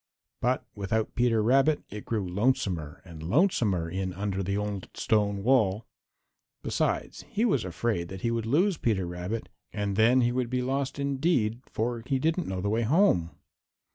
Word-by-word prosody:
But 125 Hz, +2 st, +1 dB
without 105 Hz, +2 st, -2 dB
Peter 120 Hz, -3 st, +2 dB
Rabbit 135 Hz, +6 st, +3 dB
it 105 Hz, 0 st, -7 dB
grew 105 Hz, -5 st, -2 dB
lonesomer 90 Hz, -, -1 dB
and 85 Hz, -3 st, -10 dB
lonesomer 100 Hz, -, +2 dB
in 95 Hz, +2 st, -3 dB
under 100 Hz, 0 st, -2 dB
the 100 Hz, +2 st, -1 dB
old 105 Hz, -2 st, -4 dB
stone 100 Hz, -2 st, +1 dB
wall. 110 Hz, -4 st, +3 dB, 0.8 s
Besides, -, -, -1 dB
he 225 Hz, -, +1 dB
was 140 Hz, -, +2 dB
afraid 90 Hz, 0 st, -2 dB
that 95 Hz, +1 st, -8 dB
he 115 Hz, -, 0 dB
would 115 Hz, -1 st, -2 dB
lose 170 Hz, -, +2 dB
Peter 100 Hz, -6 st, +1 dB
Rabbit, 90 Hz, +6 st, -4 dB, 0.2 s
and 100 Hz, -2 st, -2 dB
then 120 Hz, +4 st, +5 dB
he 120 Hz, 0 st, +2 dB
would 125 Hz, -1 st, -1 dB
be 125 Hz, 0 st, -1 dB
lost 135 Hz, +2 st, -1 dB
indeed, 135 Hz, -5 st, 0 dB
for 115 Hz, +1 st, -2 dB
he 135 Hz, -, +1 dB
didn't 160 Hz, +4 st, 0 dB
know 95 Hz, -1 st, -3 dB
the 100 Hz, -, -2 dB
way 110 Hz, +2 st, +1 dB
home. 120 Hz, -, +3 dB
110 Hz, 170 wpm, -28 LUFS, 95-130 Hz, 0.8 s, then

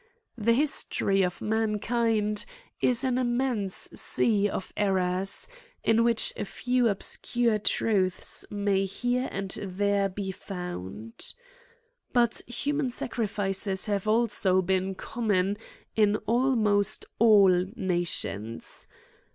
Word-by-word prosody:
The 230 Hz, 0 st, +2 dB
history 235 Hz, -7 st, +1 dB
of 180 Hz, -1 st, -1 dB
mankind 220 Hz, 0 st, 0 dB, 0.4 s
is 250 Hz, +1 st, +2 dB
an 255 Hz, -1 st, +1 dB
immense 240 Hz, -5 st, 0 dB
sea 205 Hz, -3 st, +2 dB
of 190 Hz, -, -5 dB
errors, 190 Hz, -1 st, +1 dB, 0.4 s
in 225 Hz, +1 st, +3 dB
which 230 Hz, -1 st, +3 dB
a -, -, -3 dB
few 245 Hz, +3 st, 0 dB
ob 200 Hz, -, -2 dB
scure 235 Hz, -3 st, +1 dB
truths 190 Hz, -5 st, +1 dB
may 200 Hz, -1 st, 0 dB
here 245 Hz, +6 st, -1 dB
and 195 Hz, -1 st, -4 dB
there 200 Hz, +1 st, 0 dB
be 190 Hz, 0 st, -4 dB
found. 115 Hz, -, -7 dB
CRIMES -, -, -4 dB
AND -, -, -31 dB
PUNISHMENTS. 240 Hz, -2 st, +2 dB
10/ -, -, -25 dB
But -, -, -11 dB
human 285 Hz, +2 st, 0 dB
sacrifices 200 Hz, -5 st, 0 dB
have 205 Hz, -1 st, -2 dB
also 210 Hz, -4 st, +3 dB
been 190 Hz, +1 st, 0 dB
common 205 Hz, -3 st, -1 dB, 0.4 s
in 210 Hz, -1 st, +3 dB
almost 220 Hz, -4 st, +2 dB
all 200 Hz, -5 st, +6 dB
nations. 175 Hz, -, -2 dB
210 Hz, 120 wpm, -27 LUFS, 190-240 Hz, 0.4 s, all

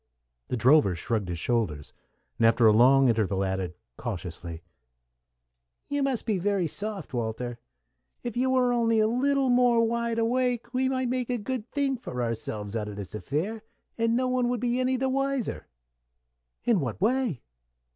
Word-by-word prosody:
The 125 Hz, -, -2 dB
drover 125 Hz, -, +5 dB
shrugged 100 Hz, +2 st, -2 dB
his 85 Hz, -, -3 dB
shoulders, 90 Hz, -, -1 dB, 0.5 s
and 115 Hz, -, +5 dB
after 115 Hz, +1 st, +4 dB
a 110 Hz, -, +8 dB
long 130 Hz, +5 st, +6 dB
interval 105 Hz, -4 st, +1 dB
added, 95 Hz, -2 st, -2 dB, 0.2 s
cautiously, 85 Hz, -7 st, -6 dB, 1.3 s
"You 285 Hz, 0 st, 0 dB
must 270 Hz, -4 st, 0 dB
be 215 Hz, -5 st, 0 dB
very 195 Hz, -1 st, +1 dB
soft, 200 Hz, +1 st, -4 dB
Walter. 120 Hz, +1 st, -3 dB, 0.6 s
If 240 Hz, -3 st, -4 dB
you 255 Hz, +2 st, +1 dB
were 255 Hz, -1 st, +3 dB
only 230 Hz, -2 st, +2 dB
a 215 Hz, -, +4 dB
little 265 Hz, +3 st, +2 dB
more 245 Hz, -2 st, +4 dB
wide 235 Hz, 0 st, -1 dB
awake, 240 Hz, +1 st, 0 dB
we 260 Hz, +1 st, +1 dB
might 260 Hz, -2 st, -1 dB
make 250 Hz, -1 st, -1 dB
a 245 Hz, -, 0 dB
good 235 Hz, +1 st, -4 dB
thing 275 Hz, -2 st, 0 dB
for 125 Hz, -, -4 dB
ourselves 110 Hz, -2 st, -4 dB
out 105 Hz, -2 st, -2 dB
of 105 Hz, -, -7 dB
this 100 Hz, -2 st, -7 dB
affair, 160 Hz, -, -3 dB, 0.3 s
and 230 Hz, 0 st, +1 dB
no 255 Hz, 0 st, +1 dB
one 250 Hz, -1 st, 0 dB
be 245 Hz, +2 st, 0 dB
any 255 Hz, 0 st, +1 dB
the 265 Hz, +1 st, 0 dB
wiser." 275 Hz, -, -1 dB, 1.0 s
"In 235 Hz, -5 st, +3 dB
what 125 Hz, -7 st, -3 dB
way?" 230 Hz, -, 0 dB
215 Hz, 165 wpm, -27 LUFS, -, 1.3 s, a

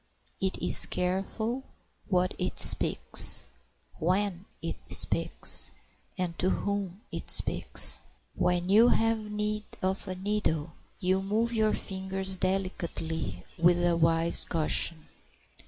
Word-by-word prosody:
It 190 Hz, 0 st, -1 dB
is -, -, +5 dB
careful 200 Hz, +7 st, -3 dB, 0.4 s
what 185 Hz, -1 st, 0 dB
it 180 Hz, 0 st, -4 dB
speaks, -, -, +5 dB, 0.5 s
when 185 Hz, +2 st, -2 dB
it -, -, -6 dB
speaks, -, -, +3 dB, 0.5 s
and 180 Hz, -2 st, -4 dB
to 185 Hz, -, +1 dB
whom 200 Hz, -1 st, -4 dB
it -, -, -7 dB
speaks. -, -, +3 dB, 0.3 s
When 180 Hz, 0 st, -1 dB
you 215 Hz, +5 st, +5 dB
have 225 Hz, -2 st, 0 dB
need 210 Hz, 0 st, -4 dB, 0.2 s
of 190 Hz, +1 st, -2 dB
a 185 Hz, -, -5 dB
needle 190 Hz, -6 st, -3 dB, 0.3 s
you 185 Hz, +1 st, 0 dB
move 220 Hz, +4 st, -2 dB
your 215 Hz, -1 st, +1 dB
fingers 190 Hz, 0 st, -4 dB
delicately 170 Hz, -, -4 dB, 0.2 s
with 175 Hz, +1 st, +2 dB
a 175 Hz, -1 st, +1 dB
wise 165 Hz, 0 st, +2 dB
caution. 160 Hz, 0 st, 0 dB
190 Hz, 115 wpm, -27 LUFS, 175-205 Hz, 0.5 s, is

